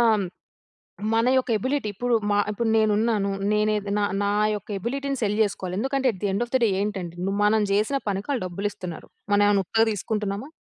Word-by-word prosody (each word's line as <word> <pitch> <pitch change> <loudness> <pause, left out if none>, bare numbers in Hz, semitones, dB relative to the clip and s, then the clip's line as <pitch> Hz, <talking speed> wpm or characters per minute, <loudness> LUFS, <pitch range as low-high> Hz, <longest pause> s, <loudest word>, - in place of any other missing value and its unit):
ఆహ్, 235 - +5
హ్మ్, 200 -3 0 0.9
మన 230 +1 +3
యొక్క 260 -1 +1
ఎబిలిటీ 260 +1 -1
ఇప్పుడు 245 +4 0 0.2
మా 205 - +3
ఇప్పుడు 225 +2 -1
నేను 215 -1 +3
ఉన్నాను. 215 -3 +1 0.2
నేనే 210 0 +2 0.2
నా 205 - +2 0.2
నా 200 - +1 0.2
యొక్క 205 - -7
ఎబిలిటీ‌ని 275 +5 -3
సెల్ 210 0 +1
చేసుకోవాలి. 185 -3 -2
ఎందుకంటే 270 +2 0
at 185 - -12
the - - +1
end 200 +5 0
of - - -25
the 260 - +4
day 225 - +4
ఏంటంటే 190 -5 -3 0.3
మనం 215 +1 +4
చేసిన 215 +7 +2
పనికి 200 +5 -2
ఆళ్ళు 250 -8 -1
డబ్బులు 195 +4 -2
ఇస్తున్నారు. 175 -4 -8 0.2
మనం 205 0 +5
ఏమైనా 200 -1 +3
ఉత్తగా 225 +4 +2
తీసుకుంటున్నామా. 210 +4 -3
210 Hz, 195 wpm, -25 LUFS, 200-235 Hz, 0.9 s, ఆహ్